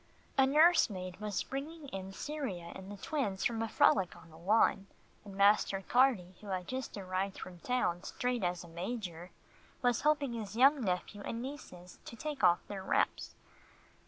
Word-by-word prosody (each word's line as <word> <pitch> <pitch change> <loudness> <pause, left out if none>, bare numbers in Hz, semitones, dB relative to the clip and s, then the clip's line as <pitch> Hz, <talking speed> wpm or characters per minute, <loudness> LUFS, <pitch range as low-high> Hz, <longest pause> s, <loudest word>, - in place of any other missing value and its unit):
A 265 -1 +5
nurse 320 +3 +6
maid 185 -2 -6
was 210 -2 -1
bringing 295 +3 -6
in 195 -2 -6
Cyria 205 - -5
and 190 +1 -9
the 205 - -7
twins 205 -5 -2
from 230 -2 0
a 225 - 0
frolic 190 -4 +3
on 165 -1 -15
the - - -14
lawn, 195 +1 +3 0.4
and 200 -2 -10
Master 200 -1 +4
Carty, 240 -8 +3
who 210 - -11
had 185 -2 -3
just 260 -3 -4
arrived 190 0 -2
from 180 -2 -9
town 175 -7 0
straight 245 +2 -2
as 175 -1 -1
a - - -11
major, 175 -1 -5 0.5
was 245 -2 +2
helping 290 -4 +2
his 215 -3 -5
young 270 +4 +5
nephew 185 +1 -2
and 230 - -4
nieces 235 - -9
to - - -8
take 290 +3 -5
off 175 0 +5
their 200 -2 -5
wraps. 190 - 0
205 Hz, 175 wpm, -33 LUFS, 185-255 Hz, 0.5 s, nurse